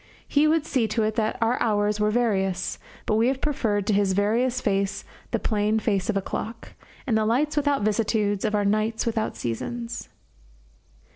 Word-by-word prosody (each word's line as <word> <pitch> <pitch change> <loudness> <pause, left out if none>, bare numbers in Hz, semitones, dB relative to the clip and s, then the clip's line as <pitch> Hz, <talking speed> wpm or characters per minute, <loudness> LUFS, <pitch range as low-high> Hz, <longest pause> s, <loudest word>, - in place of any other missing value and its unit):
He 295 +1 +3
would 315 -1 +2
see 255 -8 +1
to 225 0 0
it 215 0 0
that 220 -1 0
our 230 +2 +1
hours 210 -2 +1
were 210 0 +2
various; 195 -5 0 0.3
but 215 - +1
we 230 +2 +3
have 265 0 0
preferred 220 -9 0
to 215 - +1
his 200 -1 +2
various 235 +6 +1
face 200 -4 -1 0.2
the - - 0
plain 210 0 +1
face 200 -4 0
of 210 - +1
a 195 - -1
clock, 225 +4 -5 0.3
and 240 -6 +1
the 220 - +3
lights 270 +8 +1
without 290 -5 +1
vicissitudes 210 -1 +1
of 215 -1 +1
our 205 -1 +1
nights 215 +2 +1
without 225 -2 -1
seasons. 230 - -4
220 Hz, 185 wpm, -25 LUFS, 205-240 Hz, 0.3 s, He